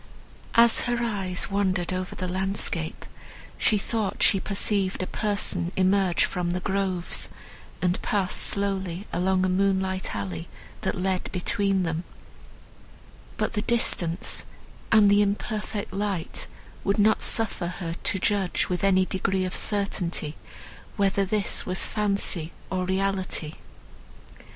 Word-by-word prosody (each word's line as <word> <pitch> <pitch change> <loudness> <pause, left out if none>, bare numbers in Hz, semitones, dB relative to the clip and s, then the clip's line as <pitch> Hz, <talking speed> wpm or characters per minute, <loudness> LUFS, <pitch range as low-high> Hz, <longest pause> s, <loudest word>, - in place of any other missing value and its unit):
As 235 0 +6
her 240 0 +1
eyes 195 -5 -2
wandered 190 -3 +1
over 185 0 -3
the 185 - -3
landscape 185 -3 -1 0.5
she 215 - +4
thought 210 0 -1
she 195 - +5
perceived 195 -1 +1
a - - -1
person 200 -4 0
emerge 190 -1 +3
from 180 -1 -2
the 180 +1 0
groves, 190 -2 -1 0.5
and 180 0 +1
pass 195 -3 +1
slowly 195 -2 0
along 185 +1 +2
a - - +2
moonlight 190 - +1
alley 90 -5 -4 0.3
that - - -1
led 185 0 -1
between 195 0 +1
them; 165 0 -1 1.3
but - - 0
the 210 - 0
distance, 190 -7 0 0.5
and 215 -2 +7
the 205 +1 +6
imperfect 210 +1 -2
light 195 -4 -2 0.4
would 200 - +1
not 215 +1 +4
suffer 205 -5 0
her 175 -1 -4
to 200 - 0
judge 195 0 +1
with 180 0 -1
any 190 -1 +4
degree 190 0 0
of 185 - -4
certainty 180 -7 -2 0.6
whether 200 -1 +2
this 200 0 0
was 185 +1 -1
fancy 200 -6 -1 0.2
or 185 -1 0
reality. 190 -4 -1
190 Hz, 125 wpm, -26 LUFS, 180-200 Hz, 1.3 s, and